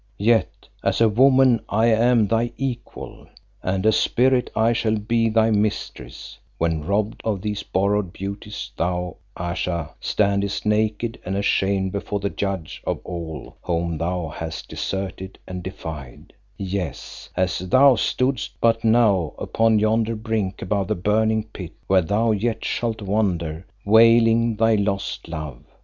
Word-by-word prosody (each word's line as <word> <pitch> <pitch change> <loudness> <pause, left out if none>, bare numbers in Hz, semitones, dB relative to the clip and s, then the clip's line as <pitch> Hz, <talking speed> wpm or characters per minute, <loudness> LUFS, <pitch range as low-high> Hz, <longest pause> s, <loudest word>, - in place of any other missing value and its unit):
Yet 115 +2 +1 0.2
as - - +1
woman 130 +2 +5
I 110 +2 +2
am 115 0 +4
thy 115 +3 0
equal, 130 -3 -6 0.3
and 95 +2 -1
as 110 0 +4
spirit 125 0 +2
I 115 +1 +3
shall 110 -1 0
be 115 +2 +1
thy 110 0 +3
mistress, 105 0 -3 0.2
when 80 -2 0
robbed 100 +5 -1
of 105 -4 -2
these 105 -1 -2
borrowed 100 -1 0
beauties 100 +3 -6
thou, 90 -1 -2 0.2
Ayesha, 85 -2 -3
standest 100 -1 0
naked 110 +2 0
and 95 +2 -3
ashamed 95 -1 +1
before 100 +1 -3
the 100 0 -2
Judge 95 -5 -4
of - - -2
all 85 -3 -7
whom 85 -2 -2
thou 85 -1 -2
hast 80 +1 -6
deserted 95 0 -4
and 90 0 -5
defied; 80 -8 -8 0.2
yes, 95 -5 -5
as 90 -1 +1
thou 130 +9 +5
stoodest 130 +4 -1
but 115 -1 +2
now 110 -7 +3
upon 115 -1 +2
yonder 110 +1 +1
brink 110 -4 -2
above 100 0 -1
the - - 0
burning 110 +3 +1
pit 95 -6 -9
where 95 -1 +4
thou 105 +6 +1
yet 110 +2 -1
shalt 115 -2 -2
wander 90 -5 -1 0.2
wailing 115 +1 +5
thy 115 +1 +3
lost 100 -1 -1
love. 75 -6 -6
105 Hz, 140 wpm, -22 LUFS, 90-115 Hz, 0.3 s, woman